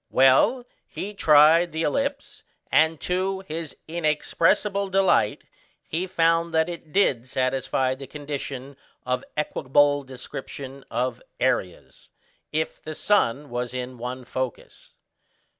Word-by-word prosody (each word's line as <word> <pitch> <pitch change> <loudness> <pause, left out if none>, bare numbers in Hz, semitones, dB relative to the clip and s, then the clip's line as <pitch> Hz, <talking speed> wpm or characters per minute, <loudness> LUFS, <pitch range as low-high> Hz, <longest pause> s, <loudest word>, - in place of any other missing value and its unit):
Well, 135 - +4 0.2
he 205 +2 -6
tried 160 0 +5
the 160 +1 -2
ellipse, 280 - -2 0.3
and 160 0 +3
to 190 +1 -1
his 165 -4 -6
inexpressible 170 +5 +1
delight 190 - +2 0.4
he 175 +4 -2
found 165 -2 +2
that 160 0 +3
it 170 -3 -8
did 135 -11 +2
satisfy 130 0 0
the 135 0 -9
condition 140 -2 -6 0.3
of 125 0 -1
equable 145 -1 +2
description 135 +1 -8
of 125 +1 -2 0.2
areas, 95 -9 -2 0.4
if 155 +1 -2
the 155 0 -7
sun 145 - +1
was 120 +1 -3
in 125 -1 -5
one 125 +1 -5
focus. 130 -1 -6
150 Hz, 115 wpm, -25 LUFS, 130-170 Hz, 0.4 s, tried